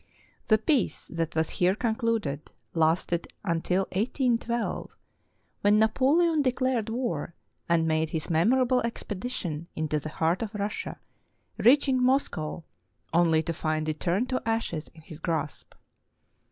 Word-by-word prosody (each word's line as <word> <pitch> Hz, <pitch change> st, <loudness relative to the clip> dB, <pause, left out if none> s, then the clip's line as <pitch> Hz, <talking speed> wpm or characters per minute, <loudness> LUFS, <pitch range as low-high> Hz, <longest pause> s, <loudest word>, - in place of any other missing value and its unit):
The 215 Hz, -, +5 dB
peace 255 Hz, +4 st, 0 dB
that 165 Hz, -1 st, -2 dB
was 160 Hz, 0 st, +1 dB
here 180 Hz, +2 st, +2 dB
concluded 220 Hz, -, -1 dB, 0.2 s
lasted 165 Hz, +1 st, +1 dB, 0.2 s
until 180 Hz, +1 st, +1 dB
181 235 Hz, +4 st, +1 dB
2, 235 Hz, 0 st, -3 dB, 0.7 s
when 205 Hz, +1 st, +5 dB
Napoleon 295 Hz, +9 st, +3 dB
declared 255 Hz, -4 st, 0 dB
war 220 Hz, -, -3 dB, 0.3 s
and 165 Hz, -1 st, +3 dB
made 160 Hz, 0 st, +1 dB
his 160 Hz, -1 st, -3 dB
memorable 250 Hz, +10 st, +3 dB
expe 230 Hz, -4 st, -4 dB
dition 170 Hz, -9 st, -4 dB
into 155 Hz, -1 st, -1 dB
the 155 Hz, -, -6 dB
heart 165 Hz, +3 st, 0 dB
of 220 Hz, -2 st, -4 dB
Russia, 210 Hz, -, -3 dB, 0.6 s
reaching 260 Hz, +1 st, +4 dB
Moscow 250 Hz, -, 0 dB, 0.5 s
only 165 Hz, -2 st, +4 dB
to 165 Hz, -, -2 dB
find 155 Hz, -1 st, -1 dB
it 155 Hz, 0 st, -2 dB
turn 185 Hz, +7 st, +1 dB
to 255 Hz, 0 st, -2 dB
ashes 225 Hz, -9 st, -2 dB
in 160 Hz, -, -14 dB
his 155 Hz, -2 st, -10 dB
grasp. 155 Hz, -3 st, -3 dB
190 Hz, 135 wpm, -27 LUFS, 160-240 Hz, 0.7 s, The